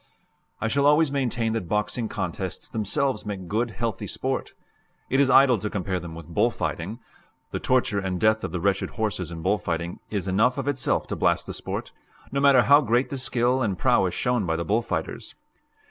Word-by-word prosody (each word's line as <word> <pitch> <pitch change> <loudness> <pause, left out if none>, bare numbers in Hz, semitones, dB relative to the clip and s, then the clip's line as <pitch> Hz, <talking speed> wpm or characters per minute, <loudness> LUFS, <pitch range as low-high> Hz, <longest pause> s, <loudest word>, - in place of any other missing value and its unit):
I - - -1
shall 140 +5 +2
always 150 0 +4
maintain 120 -5 0
that 105 -7 -3
boxing 105 +2 0
contests - - -4
themselves 115 +3 -1
make 100 -4 -5
good, 115 +5 0
healthy 110 0 -3
sport. - - -3 0.6
It 135 - +3
is 140 -2 +4
idle 130 -3 +6
to 105 - -3
compare 95 -3 -2
them 85 -2 -8
with 85 -1 -9
bull - - +3
fighting; 95 +7 -4 0.5
the - - -2
torture 125 -5 +1
and 95 -2 -2
death 110 +1 +3
of - - -3
the 90 - -2
wretched 95 +2 0
horses 105 -6 -1
in 85 -1 -7
bull 100 +2 +2
fighting 85 0 -3
is 100 -3 -3
enough 110 +8 +2
of 135 0 -3
itself 135 -4 0
to - - -2
blast - - +1
the - - -6
sport, - - -5 0.4
no 140 - 0
matter 140 -3 +6
how 145 +3 +6
great 120 0 +1
the 135 - -3
skill 125 0 +1
and 100 -6 0
prowess 95 -1 +2
shown 125 -6 0
by 80 - +1
the 85 +1 -3
bull 110 +3 +2
fighters. - - -4
110 Hz, 200 wpm, -25 LUFS, 95-130 Hz, 0.6 s, idle